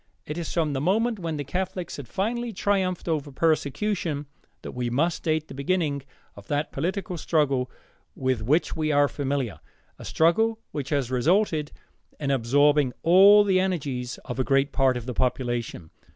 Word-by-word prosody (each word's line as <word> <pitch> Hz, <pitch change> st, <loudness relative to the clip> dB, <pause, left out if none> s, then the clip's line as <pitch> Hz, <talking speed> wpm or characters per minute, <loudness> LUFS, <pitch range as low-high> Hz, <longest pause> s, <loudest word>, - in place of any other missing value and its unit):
It 150 Hz, -, -5 dB
is 170 Hz, -2 st, -4 dB
from 160 Hz, -4 st, 0 dB
the 135 Hz, -, -2 dB
moment 220 Hz, +7 st, +1 dB
when 165 Hz, -3 st, -3 dB
the 145 Hz, -, -3 dB
Catholics 180 Hz, +3 st, -4 dB
had 140 Hz, -4 st, -8 dB
finally 235 Hz, -, -2 dB
triumphed 190 Hz, -3 st, -1 dB
over 150 Hz, -3 st, -1 dB
persecution 160 Hz, +1 st, 0 dB, 0.4 s
that -, -, -6 dB
we 125 Hz, -1 st, -3 dB
must 155 Hz, +8 st, 0 dB
date 155 Hz, -1 st, 0 dB
the -, -, -10 dB
beginning 145 Hz, 0 st, -1 dB, 0.3 s
of 100 Hz, -1 st, -13 dB
that 145 Hz, +1 st, -1 dB
political 180 Hz, +3 st, -3 dB
struggle 140 Hz, -6 st, +1 dB, 0.5 s
with 130 Hz, -3 st, -1 dB
which 145 Hz, +10 st, +1 dB
we 155 Hz, -1 st, 0 dB
are 145 Hz, 0 st, +4 dB
familiar, 135 Hz, -, -3 dB, 0.4 s
a -, -, -9 dB
struggle 220 Hz, +8 st, +2 dB
which 140 Hz, -2 st, -4 dB
has 140 Hz, -4 st, -1 dB
resulted 155 Hz, -, +1 dB, 0.5 s
in 140 Hz, -2 st, -1 dB
absorbing 140 Hz, +2 st, +3 dB
all 195 Hz, +5 st, +7 dB
the 190 Hz, -2 st, +2 dB
energies 140 Hz, -10 st, -2 dB
of 125 Hz, +1 st, -5 dB
a -, -, +3 dB
great 135 Hz, +2 st, +2 dB
part 135 Hz, -2 st, +2 dB
of 120 Hz, -, -6 dB
the 125 Hz, -, -4 dB
population. 120 Hz, -9 st, -2 dB
150 Hz, 165 wpm, -25 LUFS, 135-180 Hz, 0.5 s, all